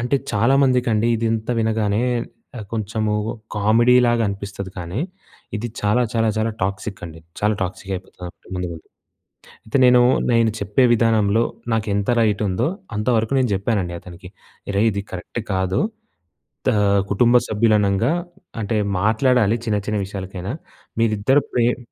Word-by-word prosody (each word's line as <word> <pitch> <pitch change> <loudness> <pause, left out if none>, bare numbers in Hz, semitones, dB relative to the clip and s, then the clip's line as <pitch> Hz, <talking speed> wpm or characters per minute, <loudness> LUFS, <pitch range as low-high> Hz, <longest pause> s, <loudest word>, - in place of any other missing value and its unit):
అంటే, 125 +4 +1 0.2
చాలా 115 +6 +3
మందికండీ, 120 -3 +2
ఇదింత 115 0 -1
వినగానే 110 -2 0 0.6
ఆహ్, 110 - -6
కొంచెమూ 110 0 -1 0.4
కామిడీలాగనిపిస్తది, 110 -3 +2
కానీ, 90 +7 -4 0.6
ఇది 120 +3 -4
చాలా, 105 +4 +2
చాలా, 115 -1 +1
చాలా 110 +1 0
టాక్సిక్కండి. 95 -4 -4 0.2
చాలా 105 +1 +2
టాక్సికయిపోతది 95 -1 -7
ముందు 90 -1 -3
ముందు. 80 - -11 0.8
అయితే, 110 - -2
నేనూ, 125 0 +6 0.3
నేను 115 -1 +3
చెప్పే 105 +6 +2
విధానంలో 110 -1 +3 0.3
నాకెంత 100 -2 -1
రైటుందో 105 +1 +1 0.3
అంతవరకు 110 +2 +1
నేను 125 -3 +1
జెప్పానండి 95 -3 -1
అతనికి. 90 +1 -12 0.5
"రేయ్! 110 +3 +4
ఇది 100 0 -3
కరక్ట్ 95 +6 -5
కాదు. 95 +1 0 0.9
దా - - +3 0.4
కుటుంబ 120 +4 +3
సభ్యులనంగా 105 +2 +2 0.5
అంటే, 105 +1 -1 0.2
మాట్లాడాలి 115 +1 +3
చిన్న 105 - +1
చిన్న 105 -1 -1
విషయాలకైనా. 95 +2 -6 0.5
మీరిద్దరు 115 +5 +3
ప్రేమ్" 120 0 +2
110 Hz, 120 wpm, -21 LUFS, 100-115 Hz, 0.9 s, నేనూ